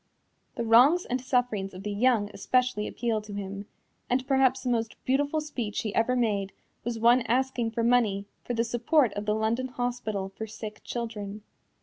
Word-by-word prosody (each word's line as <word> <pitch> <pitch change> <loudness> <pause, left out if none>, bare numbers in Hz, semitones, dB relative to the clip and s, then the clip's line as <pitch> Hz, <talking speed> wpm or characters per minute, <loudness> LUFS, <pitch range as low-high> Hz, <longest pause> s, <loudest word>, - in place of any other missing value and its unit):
The 235 - -2
wrongs 250 +10 +6
and 255 +1 -2
sufferings 245 -7 0
of 185 - -8
the 210 - -3
young 215 -1 +2
especially 250 -4 +1
appealed 225 -3 -2
to 205 -1 -7
him, 200 0 -5 0.4
and 255 +1 +1
perhaps 265 -1 +3
the 255 - -1
most 225 -1 -1
beautiful 285 +4 +1
speech 245 -9 -3
he 215 -2 -3
ever 230 +3 +2
made 205 -5 0 0.3
was 235 0 -3
one 235 +3 +5
asking 250 -1 +1
for 230 +1 -2
money 225 -5 +2 0.2
for 245 - -3
the 230 - +2
support 240 +1 +2
of 205 +1 -5
the 210 - +2
London 225 +4 0
Hospital 245 -6 -3
for 220 +3 -7
Sick 215 0 -8
Children. 215 -3 -5
230 Hz, 180 wpm, -28 LUFS, 210-250 Hz, 0.4 s, wrongs